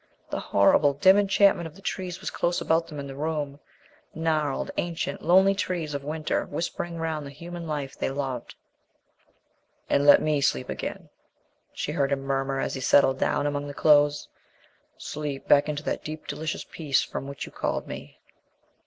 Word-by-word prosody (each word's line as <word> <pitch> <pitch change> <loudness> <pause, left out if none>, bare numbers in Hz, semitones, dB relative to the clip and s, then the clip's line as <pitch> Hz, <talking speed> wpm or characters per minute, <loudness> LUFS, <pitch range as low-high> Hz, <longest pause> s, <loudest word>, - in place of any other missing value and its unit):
The - - -1
horrible, 140 +8 +4
dim 190 +6 +6
enchantment 195 -3 +3
of 160 - -14
the 195 - -15
trees 180 -3 -4
was - - -4
close 175 0 0
about 165 +1 +1
them 150 -3 -7
in 140 - -5
the 135 -1 -8
room 145 -1 -3 0.6
gnarled, 155 -3 0
ancient, 170 -1 -2
lonely 190 +3 +5
trees 175 -6 -2
of 140 -1 -4
winter, 155 +1 -1
whispering 170 +2 -4
round 160 -2 -2
the 140 - -7
human 170 +3 -8
life 145 -3 -4
they - - -2
loved. 135 -3 -4 1.4
"And 140 +1 +3
let 145 - +9
me 150 -2 +1
sleep 65 - 0
again," - - -5 0.6
she - - -4
heard 145 -3 0
him 140 -1 0
murmur 135 0 -1
as - - -2
he 130 - -4
settled 135 0 +4
down 145 - +1
among 145 0 -2
the 145 - -7
clothes, 145 -1 +4 0.7
"sleep 145 -2 -5
back 145 +1 +5
into 150 0 -3
that - - -3
deep, 155 0 -7
delicious 160 0 -4
peace 145 -5 0
from 135 - -6
which 140 -1 -6
you - - -12
called - - -2
me." - - -8
150 Hz, 175 wpm, -26 LUFS, 140-165 Hz, 1.4 s, let